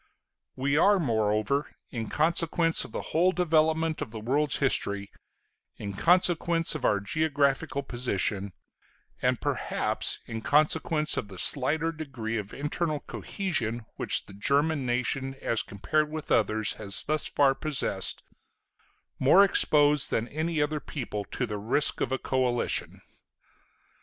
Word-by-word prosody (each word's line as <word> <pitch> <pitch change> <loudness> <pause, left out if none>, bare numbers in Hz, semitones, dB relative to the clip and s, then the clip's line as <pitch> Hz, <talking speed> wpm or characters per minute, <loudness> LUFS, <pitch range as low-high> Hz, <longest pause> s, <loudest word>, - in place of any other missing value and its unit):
We 140 +2 0
are, 200 +3 +5
moreover, 110 - 0 0.2
in 115 -4 -5
consequence 165 +1 +1
of - - -10
the - - -5
whole 175 +3 +3
development 160 -2 +1
of - - -4
the 110 0 -8
world's 140 +6 0
history, 100 -7 0 0.7
in 100 -1 -6
consequence 170 - +2
of 155 - -6
our 100 - +2
geographical 140 +3 0
position, 100 -6 -2 0.7
and - - +1
perhaps - - -1
in 115 -1 -6
consequence 155 +3 +2
of - - -3
the 95 -2 -11
slighter 150 - +2
degree 130 -8 -5
of 105 -1 -8
internal 150 +1 -3
cohesion 120 - -3
which - - +1
the - - -13
German 140 +6 0
nation 130 +2 -1
as 115 - 0
compared 150 +10 -1
with 155 0 -7
others 110 0 +2
has 100 -2 +3
thus 155 0 0
far 140 -2 +3
possessed, 135 -10 0 1.0
more 175 +9 +6
exposed 150 -6 +4
than 115 +1 -1
any 160 +2 -2
other 150 +1 -2
people 105 -9 -6
to 125 - -3
the 105 -3 -5
risk 115 +8 +2
of 130 - -1
a 130 - 0
coalition. 125 -1 -1
140 Hz, 135 wpm, -27 LUFS, 115-155 Hz, 1.0 s, more